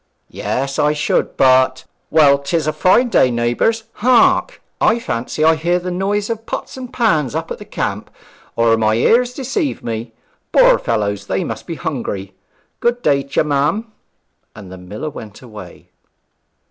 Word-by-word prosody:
'Yes, 135 +1 -3
I 150 0 +3
should, 150 -1 -1
but. 130 0 +3 0.2
Well, 145 -3 +5
'tis 155 +3 -1
a 155 - 0
fine 185 +10 +3
day, 130 - +4
neighbours. 120 - 0
Hark! 255 - +3 0.3
I 225 - +2
fancy 155 - -3
I 160 +1 +6
hear 170 +3 0
the 180 0 -4
noise 200 +3 -1
of 225 0 -6
pots - - -5
and 255 -1 -8
pans 155 - +1
up - - -4
at - - -5
the - - -10
camp, - - -4 0.5
or 115 -1 +3
my 110 -1 +2
ears 240 - +3
deceive 280 - -3
me. 115 0 -4 0.4
Poor - - +5
fellows, 105 -3 -2
they - - -1
must - - -6
be - - -4
hungry! 95 0 -5 0.5
Good 240 +1 0
day 140 -1 +3
t'ye, 140 +2 -1
ma'am.' 150 +10 0 0.6
And 100 -4 -11
the 95 - -9
miller 105 +12 -6
went 110 -2 -11
away. 105 -7 -12
150 Hz, 160 wpm, -18 LUFS, -, 0.6 s, I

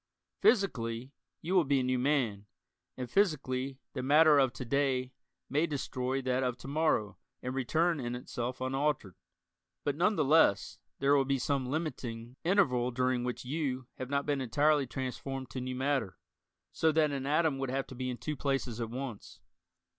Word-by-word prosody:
Physically, 130 - +1 0.3
you 175 +4 -2
will 185 -3 +5
be 140 -2 +2
a - - -1
new 130 0 +1
man, 125 -7 0 0.5
and 125 -1 -4
physically 135 - 0 0.2
the 130 - -3
matter 150 +2 +6
of 135 -2 +3
to 130 - -6
day 130 0 0 0.3
may 150 +5 +1
destroy 130 -2 -2
that 130 0 +1
of 125 -1 -1
to - - -10
morrow 140 -9 0 0.2
and 125 - -3
return 160 +5 +1
in 120 -1 -3
itself 125 +1 -5
unaltered. 135 -6 -1 0.7
But 145 - 0
none 185 +7 +2
the 155 -5 +1
less 135 - +3 0.2
there 140 +1 +3
will 135 -1 +3
be 135 0 +1
some 135 0 -1
limiting 125 -6 -4
interval 145 -10 +3
during 125 0 0
which 125 0 -4
"you" 130 -2 -2
have 130 - -4
not 140 0 0
been 145 -2 0
entirely 145 +3 +2
transformed 130 +1 -5
to 130 - -4
new 130 0 -4
matter, 130 -6 -1 0.6
so 160 - +3
that 155 -1 +3
an 135 -1 -3
atom 150 -2 +2
would 135 -1 -2
have 135 +1 -1
to - - -11
be 130 0 -3
in 125 - -4
two 150 +7 -4
places 135 -4 -2
at 115 - -3
once. 125 -2 -7
135 Hz, 175 wpm, -31 LUFS, 125-145 Hz, 0.7 s, matter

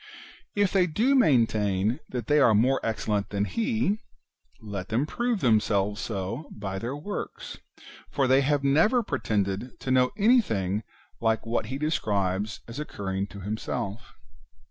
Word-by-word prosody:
If 205 -2 +2
they 185 -2 +4
do 225 - +2
main 145 - +5
tain 105 +1 0
that 125 -3 -4
they 150 +4 +3
are 120 -6 +5
more 130 +6 +3
excellent 105 -2 -1
than 100 0 0
he, 220 - 0 0.6
let 100 -3 -6
them 120 +6 +1
prove 240 +3 -1
themselves 105 -3 +2
so 110 +8 -4
by 95 -2 -5
their 120 +6 -4
works, 185 +8 -6 0.5
for 135 - +1
they 130 +1 +5
have 145 0 +1
never 165 - +4
pretended 110 - -2
to 130 -1 +2
anything 115 - +2 0.4
like 110 -1 +1
[what 115 -1 -1
he 130 +3 -4
describes 105 - -1
as 115 +4 -7
occurring 100 -9 -3
to 100 -1 -10
himself]. 105 +2 -4
115 Hz, 145 wpm, -27 LUFS, 105-150 Hz, 0.6 s, main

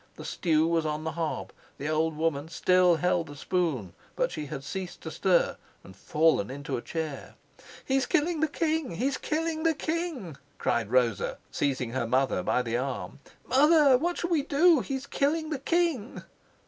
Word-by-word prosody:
The - - -9
stew 160 -2 +1
was 165 -1 +1
on 155 0 -2
the 160 - -2
hob, 165 -1 -3 0.2
the 145 - -4
old 155 0 0
woman 160 -1 -1
still 180 +1 +4
held 175 0 +1
the 145 - -9
spoon, 145 - -1 0.2
but - - 0
she 150 -1 -5
had 135 0 -6
ceased 185 +5 -6
to 160 - -6
stir 185 0 +2 0.3
and 95 - -13
fallen 150 -3 +2
into 140 +2 -4
a - - -3
chair. 155 -2 -5 0.5
"He's 265 -1 +1
killing 325 +2 +1
the 315 - +2
king! 310 - -1
He's 260 +8 -1
killing 320 0 -1
the 325 -1 +2
king!" 310 - -3 0.2
cried 110 -3 0
Rosa, 120 -4 +1
seizing 130 -4 -1
her 120 -2 -1
mother 130 -4 +1
by 125 - +1
the 115 0 -1
arm. 125 -6 -4 0.3
"Mother, 290 +1 +6
what 345 +7 0
shall 345 - -3
we 320 -4 +3
do? 310 +3 +4
He's 265 +1 -4
killing 310 +3 0
the 295 - -2
king!" 320 -6 0
175 Hz, 175 wpm, -28 LUFS, -, 0.5 s, Mother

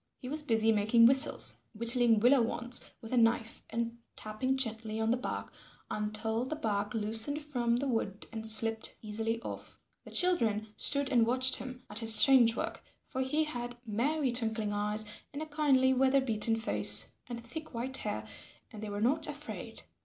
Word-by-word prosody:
He 250 - -10
was 305 +2 0
busy 225 -5 +1
making 220 +2 +3
whistles, 265 +4 +4 0.2
whittling 235 0 +2
willow 250 +2 +4
wands 240 +1 -3
with 225 - -10
a - - +1
knife 225 -1 0
and 235 0 -4 0.2
tapping 255 +5 -3
gently 225 -3 -3
on 220 0 0
the - - +2
bark 250 - -6 0.4
until 215 +2 -2
the 260 +5 -5
bark 210 -6 -3
loosened 225 +7 0
from 245 -6 -2
the 275 +3 -3
wood 220 -5 -4
and 220 -1 -5
slipped 225 0 +4
easily 225 +2 -3
off. - - -9 0.2
The - - -13
children 225 - 0
stood 280 -1 +2
and 235 -3 +2
watched 255 +2 +6
him 255 -1 -9
at 210 +1 -6
his 225 -1 +8
strange 240 -3 +6
work, - - -5 0.3
for 260 - -4
he 295 +4 0
had 245 -5 -6
merry 260 +6 -1
twinkling 220 -3 -1
eyes, 210 +1 -1 0.3
and 285 - -6
a 310 - -5
kindly 285 -4 +1
weather 265 +1 +2
beaten 225 -3 0
face, 225 +1 +4
and 240 -1 -7
thick 245 +5 -10
white 260 +3 -1
hair, 110 - -5 0.5
and 215 - -10
they 215 - -6
were 205 0 -5
not 290 +7 +1
afraid. 295 0 -9
235 Hz, 175 wpm, -30 LUFS, 220-260 Hz, 0.5 s, his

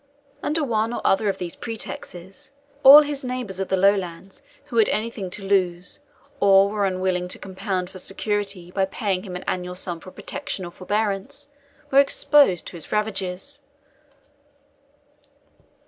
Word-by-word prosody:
Under 305 +1 0
one 225 -3 0
or - - -4
other 200 +2 +3
of 195 - -2
these 175 -2 -5
pretexts, 195 -4 -7 0.3
all 290 +2 +11
his 290 -2 -4
neighbours 250 -7 -4
of 195 - -2
the 190 - +1
Lowlands 190 -1 0 0.2
who 260 -5 -5
had 220 - +5
anything 215 -3 -2
to 195 +3 -6
lose, 180 -1 +1 0.4
or 195 0 +6
were 205 -1 0
unwilling 185 -1 -1
to 180 - -4
compound 190 -1 -3
for 185 - -9
security 195 -2 -3
by 195 +1 +1
paying 195 -1 -2
him 185 -3 -8
an 180 - -6
annual 180 0 -3
sum 175 -2 -4
for 185 - -11
protection 280 -2 -5
or 175 - -8
forbearance, 205 +8 -2 0.4
were 275 - +6
exposed 280 - +4
to 175 - -8
his 155 - -8
ravages. 210 +5 -2
195 Hz, 150 wpm, -23 LUFS, 185-225 Hz, 0.4 s, all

